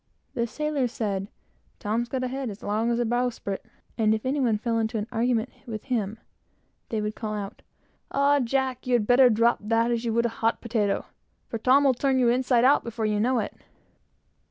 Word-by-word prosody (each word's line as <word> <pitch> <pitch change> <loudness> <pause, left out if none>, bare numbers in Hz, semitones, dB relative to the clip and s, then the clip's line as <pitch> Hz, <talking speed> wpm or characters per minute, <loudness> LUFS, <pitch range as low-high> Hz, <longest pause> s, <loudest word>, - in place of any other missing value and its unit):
The 235 0 -1
sailors 290 -2 -1
said, 200 -4 -2 0.5
"Tom's 230 +3 -2
got 260 0 -2
a - - 0
head 265 0 -3
as 205 0 -9
long 215 +3 0
as 235 - +1
the 240 - +1
bowsprit," 240 -4 -2 0.4
and 220 -1 +4
if 215 - -6
any 275 +3 0
one 240 -5 +2
got 230 -2 +1
into 220 0 -1
an 210 - -2
argument 235 +1 0 0.2
with 215 -3 -5
him, 225 -5 -2 0.7
they 220 -2 -1
would 210 0 -2
call 215 -1 -4
out 200 -1 -6 0.5
"Ah, 285 +1 +3
Jack! 260 0 -1
you'd 240 -4 +2
better 250 +2 +6
drop 230 +1 +3
that, 230 +2 +1
as 235 0 -1
you 235 - -1
would 235 +1 +2
a - - +2
hot 225 +1 +2
potato, 220 -4 -1 0.4
for 230 - -4
Tom 260 +5 +4
will 270 -2 +4
turn 265 +1 +1
you 245 -2 +4
inside 250 0 +3
out 280 +3 +5
before 230 -1 -3
you 210 -1 +1
know 250 +4 +2
it." 215 - -2
235 Hz, 205 wpm, -26 LUFS, 220-255 Hz, 0.7 s, better